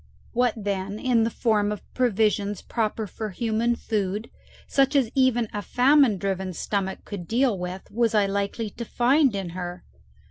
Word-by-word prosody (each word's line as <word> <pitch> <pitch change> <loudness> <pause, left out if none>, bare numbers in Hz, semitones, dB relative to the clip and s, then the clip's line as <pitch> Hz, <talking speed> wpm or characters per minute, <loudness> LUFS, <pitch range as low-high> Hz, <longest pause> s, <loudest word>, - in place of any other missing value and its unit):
What, 245 -1 +2
then, 200 -1 -3
in 235 -1 +2
the - - +1
form 215 -3 +1
of 210 - -5
provisions 210 -4 +1
proper 220 -1 -1
for 215 +2 -5
human 230 +3 0
food, 210 -1 -2 0.3
such 275 +1 +2
as 255 -5 +3
even 255 -3 +3
a 205 - -2
famine 255 -1 +4
driven 190 -1 -2
stomach 190 +2 -3
could 185 -5 -7
deal 245 -1 +2
with, 180 +1 -5
was 230 0 +1
I 205 -1 +4
likely 200 +2 -2
to 235 - -6
find 255 +2 +3
in 195 -3 -3
her? 175 0 -6
215 Hz, 165 wpm, -25 LUFS, 200-240 Hz, 0.3 s, famine